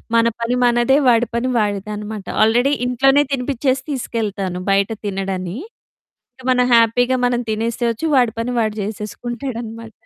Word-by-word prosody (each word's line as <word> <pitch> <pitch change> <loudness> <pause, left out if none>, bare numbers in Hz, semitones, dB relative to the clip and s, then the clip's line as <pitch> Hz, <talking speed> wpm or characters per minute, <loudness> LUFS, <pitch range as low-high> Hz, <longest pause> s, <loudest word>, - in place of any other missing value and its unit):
మన 230 0 +4 0.2
పని 235 +2 0
మనదే, 240 +2 +3
వాడి 235 0 +4
పని 250 +2 0
వాడిదనమాట. 210 0 -3 0.2
ఆల్రెడీ 245 +5 +3
ఇంట్లోనే 270 +3 +3
తినిపించేసి 260 0 -1
తీసుకెళ్తాను. 210 -8 -3
బయట 195 +1 +2 0.2
తినడని, 190 -1 -3 0.8
ఇక 260 - -15
మనం 250 -1 +3
హ్యాపీగా 245 +2 +3
మనం 245 -1 +1
తినేసేయచ్చు 230 +4 -1
వాడి 245 -4 +4
పని 230 +2 -2
వాడు 215 -2 0
చేసేసుకుంటాడనమాట. 230 +2 -6
230 Hz, 125 wpm, -19 LUFS, 210-250 Hz, 0.8 s, మన